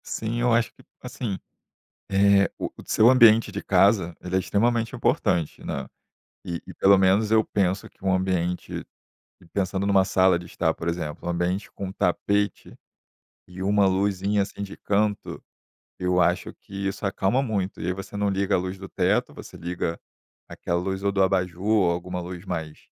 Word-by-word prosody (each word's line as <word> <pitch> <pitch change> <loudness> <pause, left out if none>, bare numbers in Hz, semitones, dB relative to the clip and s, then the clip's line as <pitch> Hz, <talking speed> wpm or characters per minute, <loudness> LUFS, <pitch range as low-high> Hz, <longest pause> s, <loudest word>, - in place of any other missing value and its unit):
Sim, 115 +2 -3
eu 120 0 +3
acho 120 +1 +1
que, - - -20 0.2
assim, 120 -5 -4 0.7
eh, 100 0 +4
o - - -3 0.2
seu 110 +3 +5
ambiente 115 -4 +6
de 100 - -4
casa, 95 -3 +3
ele 90 +1 -2
é - - +4
extremamente 115 +4 0
importante, 85 -4 0
né? - - -4 0.6
E 85 -1 -5
e - - -10
pelo 100 +1 +5
menos 95 +3 +3
eu 110 0 +5
penso 95 -1 -1
que - - -20
um 95 - +2
ambiente, 90 -1 -2 0.7
pensando 95 0 -1
numa 95 -1 +4
sala 95 -2 +3
de 85 - -9
estar, 85 -1 -1
por 80 - -6
exemplo, 85 -3 -4
um - - +1
ambiente 90 +3 -2
com 95 -1 -6
tapete 100 +2 -1 0.7
e 90 +1 -8
uma 100 +1 +3
luzinha, 100 +1 +1
assim, 100 +1 -6
de 100 - -7
canto, 105 0 -1 0.6
eu 90 0 +1
acho 85 - +1
que 100 0 -7
isso 100 +2 -4
acalma 100 +5 +1
muito. 100 -7 -2
E - - -3
aí 90 - +1
você 95 +2 -8
não 100 0 +1
liga 95 0 0
a - - +4
luz 95 +1 -4
do 95 0 -9
teto, - - 0
você - - -11
liga 85 -1 -3 0.5
aquela 85 - -2
luz 95 +1 -3
ou 100 - +2
do 95 0 +2
abajur 90 -2 0
ou 105 -5 +4
alguma 90 +1 -3
luz 90 0 -7
mais 80 -5 -5
95 Hz, 180 wpm, -25 LUFS, 90-100 Hz, 0.7 s, ambiente